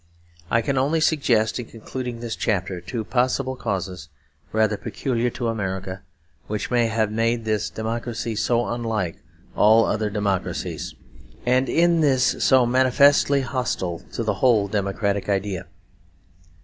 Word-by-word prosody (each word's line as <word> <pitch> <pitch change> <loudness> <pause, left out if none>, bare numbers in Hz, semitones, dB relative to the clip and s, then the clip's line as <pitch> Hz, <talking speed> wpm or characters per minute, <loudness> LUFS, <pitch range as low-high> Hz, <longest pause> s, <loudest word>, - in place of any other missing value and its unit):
I 115 0 +2
can 135 -2 0
only 150 +5 +1
suggest, 125 -8 +2
in 120 - -6
concluding 120 +1 -6
this 115 -1 -4
chapter, 95 -3 -1
two 110 +6 -4
possible 130 +3 0
causes 95 - -4 0.4
rather 110 -1 +2
peculiar 120 +2 -2
to 120 0 -4
America, 95 -4 -3 0.5
which 105 +3 -3
may 120 -1 +3
have 110 -1 0
made 115 +1 0
this 110 -1 0
great - - -27
democracy 115 0 -3
so 120 +2 +1
unlike 110 -7 -2 0.4
all 110 +2 +5
other 110 0 0
democracies, 100 -2 -2 0.5
and 130 +2 +2
in 170 0 +3
this 135 -4 +2
so 130 -2 +5
manifestly 135 +3 +4
hostile 120 -10 -2
to 115 - -2
the 110 -1 0
whole 115 -6 +4
democratic 100 0 -1
idea. 100 -2 -1
115 Hz, 135 wpm, -23 LUFS, 105-125 Hz, 0.5 s, all